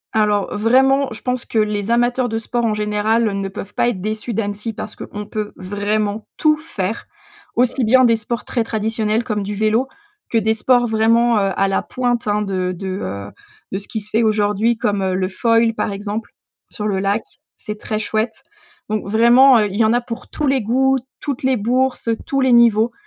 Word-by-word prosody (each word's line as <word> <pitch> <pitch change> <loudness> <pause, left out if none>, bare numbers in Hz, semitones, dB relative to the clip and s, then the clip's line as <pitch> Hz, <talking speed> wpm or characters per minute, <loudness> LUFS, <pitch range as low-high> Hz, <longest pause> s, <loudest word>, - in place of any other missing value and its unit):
Alors, 210 -2 +1
vraiment 265 +5 +3
je 220 - -7
pense 250 -1 -1
que 225 - -4
les 210 0 0
amateurs 245 +1 +2
de 225 - -2
sport 235 +1 -2
en 215 -1 +1
général, 210 +2 +1
heu, 200 - -1
ne 195 -1 -3
peuvent 195 +1 -8
pas 240 - +2
être 190 - -3
déçus 215 +1 -3
d'Annecy 210 +1 -3
parce 215 0 -7
qu'on 210 0 -7
peut 210 0 -5
vraiment 205 +2 -2
tout 305 -1 +4
faire. 225 - -4 0.5
Aussi 250 +1 +1
bien 255 +3 +5
des 230 -1 +4
sports 230 +2 -4
très 235 -3 -1
traditionnels 220 0 -1
comme 215 -4 -2
du 205 +1 -4
vélo, 220 +5 +1 0.4
que 230 - +1
des 220 0 +2
sports 245 +2 +2
vraiment, 230 +1 +3
heu, 195 -1 +1
à 195 - +2
la 195 - 0
pointe, 245 -3 -2
hein, 210 0 +1
de 185 -2 -2
de, 190 +2 -6
heu, 100 +1 -5 0.4
de 190 - -2
ce 200 - -13
qui 220 -3 -4
se 210 - -11
fait 225 - +2
aujourd'hui 215 +1 +1
comme, 205 -3 0
heu, 185 -1 0
le 185 0 0
foil, 230 +2 +2
par 210 - -2
exemple, 205 +3 -5 0.4
sur 210 - -5
le 195 -2 0
lac, 200 +3 0 0.3
c'est 210 -1 -7
très 215 -1 -3
chouette 220 +2 -2 0.5
donc 215 -2 -2
vraiment, 240 +3 +6
heu, 210 - +2
il 200 +1 -5
y 225 - +4
en 220 - +3
a 245 - +2
pour 230 -1 -8
tous 300 - -3
les 265 -2 +2
goûts, 265 +5 +2 0.2
toutes 275 -3 -4
les 260 0 +3
bourses, 250 +2 0
heu, 225 - +1
tous 275 -1 0
les 260 -1 +3
niveaux 235 -1 +5
220 Hz, 210 wpm, -19 LUFS, 205-240 Hz, 0.5 s, vraiment